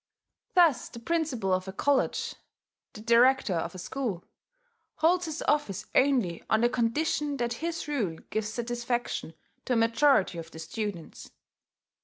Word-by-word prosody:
Thus 335 -8 +4
the - - -11
principal 250 - -1
of 185 +1 -1
a - - -4
college, 275 +7 0 0.6
the 215 - -10
director 235 -1 +4
of 170 +2 -2
a - - -6
school, 200 -1 -4 0.7
holds 350 +3 +2
his 315 0 -4
office 215 -9 0
only 250 -11 +2
on 220 - +3
the 240 - +4
condition 285 +5 0
that 240 -1 -1
his 335 -1 -3
rule 220 - -1
gives 215 -1 -1
satisfaction 240 -6 -3 0.3
to 255 - 0
a - - +2
majority 230 -5 +3
of 165 0 -8
the 160 - -12
students. 175 +1 -6
235 Hz, 145 wpm, -28 LUFS, 200-285 Hz, 0.7 s, Thus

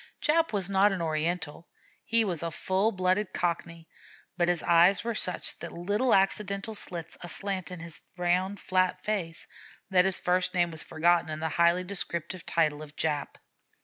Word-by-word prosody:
Jap 325 +2 +2
was 200 -4 -1
not 200 +1 +3
an 195 - -2
Oriental; 160 0 -2 0.4
he 230 -1 +3
was 175 -6 -3
a 170 - -2
full 190 +6 0
blooded 185 +1 0
Cockney, 170 -1 -3 0.5
but 175 -2 +1
his 175 -2 0
eyes 175 +3 +5
were 235 0 -2
such 185 -4 0
little 205 +9 0
accidental 200 +2 0
slits 170 -5 -2
aslant 185 +2 -1
in 180 -2 -8
his 165 -1 -8 0.2
round, 180 +3 0
flat 185 0 +1
face, 180 -6 -3 0.5
that 180 -1 +5
his 190 -1 +4
first 180 +1 0
name 175 -1 +2
was 160 -1 -2
forgotten 170 +1 +1
in 155 0 -4
the 160 0 -2
highly 170 +3 +3
descriptive 180 -2 -4
title 155 -3 +1
of 150 -1 -11
"Jap." 150 -2 -2
180 Hz, 165 wpm, -28 LUFS, 170-195 Hz, 0.5 s, eyes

